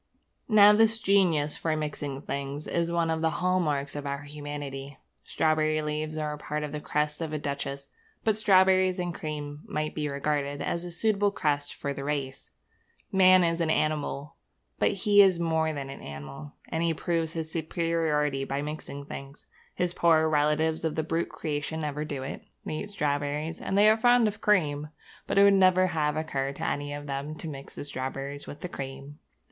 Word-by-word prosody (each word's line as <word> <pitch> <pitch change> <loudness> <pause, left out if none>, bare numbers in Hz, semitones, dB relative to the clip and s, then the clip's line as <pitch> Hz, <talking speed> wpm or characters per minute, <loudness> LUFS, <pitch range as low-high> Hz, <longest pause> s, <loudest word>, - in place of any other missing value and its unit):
Now 210 -1 +8
this 225 +1 +4
genius 180 -8 +2
for 160 -1 -1
mixing 145 -2 -4
things 140 +1 -4
is 170 0 -1
one 170 -1 +1
of 160 0 -1
the 160 - +3
hall 185 +1 +2
marks 145 -4 -1
of 145 -1 -4
our 140 +1 -3
humanity. 145 -2 -6 0.3
Strawberry 155 -1 +1
leaves 155 +1 -3
are 150 -1 -2
part 150 0 -3
of 150 - -4
the 150 0 -4
crest 150 +1 -1
of 160 -2 -3
a - - 0
duchess; 140 -1 -4 0.3
but 220 -2 +2
strawberries 190 -3 +4
and 175 -1 -2
cream 150 -2 -5
might 155 0 -2
be 150 -1 -2
regarded 145 0 -1
as 170 - -2
a - - -5
suitable 205 +3 +2
crest 145 -6 -1
for 140 - -3
the 140 - -6
race. 140 -2 -3 0.6
Man 185 -1 +6
is 165 0 +1
an 165 - +1
animal, 150 -1 -1 0.4
but - - +3
he 205 +1 +5
is 190 -3 +5
more 160 -1 +1
than 140 -2 -5
an 135 - -9
animal; 70 - -8 0.2
and 160 - -1
he 165 -1 +1
proves 165 -1 -1
his 160 -1 -4
superiority 160 -4 0
by 140 +1 -2
mixing 145 -2 -6
things. 140 0 -9 0.3
His 180 -1 0
poorer 160 -2 +4
relatives 155 +1 +1
of 160 -2 -1
the 160 - 0
brute 165 +2 -1
creation 155 0 -3
never 150 0 -2
do 140 -3 -4
it. 135 - -6 0.2
They 155 - -3
eat 205 - -5
strawberries, 150 -2 -2
and 195 - -1
they 205 +1 +7
are 215 +1 +6
fond 245 0 +5
of 210 - -4
cream; 150 -8 +2 0.4
but - - -1
it 200 - +8
would 200 0 +7
never 185 -1 +5
have 155 -4 0
occurred 140 -3 -2
to - - -4
any 145 0 -2
one 145 0 -4
of - - -11
them 140 +2 -4
to 160 - -7
mix 140 -3 -8
the - - -5
strawberries 140 +1 -5
with 145 - -9
the - - -3
cream. 140 -1 -7
155 Hz, 195 wpm, -28 LUFS, 145-170 Hz, 0.6 s, Now